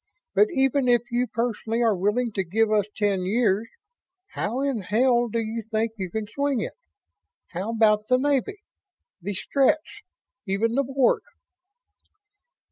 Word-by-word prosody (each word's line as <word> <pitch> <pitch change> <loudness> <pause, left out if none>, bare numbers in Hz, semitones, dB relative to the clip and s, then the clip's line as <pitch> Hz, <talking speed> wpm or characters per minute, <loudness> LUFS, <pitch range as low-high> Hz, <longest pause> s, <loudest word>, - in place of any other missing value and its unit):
But 205 +2 +5
even 270 0 +2
if 240 -2 +4
you 245 +1 +1
personally 230 0 -1
are 225 -3 +3
willing 210 +6 0
to 195 -2 -1
give 215 +5 +1
us 210 -2 +2
ten 205 -3 +1
years, 210 +1 +1 0.6
how 235 +6 -3
in 275 -4 0
hell 240 +5 +2
do 230 - -3
you 225 0 -2
think 220 +1 -1
you 190 -2 -4
can 220 +4 -3
swing 280 +3 -1
it? - - -4 0.8
How 185 +5 -4
about 215 -2 +3
the 255 - +4
Navy 285 +8 0 0.6
the 200 +3 -4
Stretts 275 +9 0 0.5
even 210 +4 0
the 275 +3 +2
Board?" 270 -1 +2
225 Hz, 145 wpm, -25 LUFS, 210-250 Hz, 0.8 s, But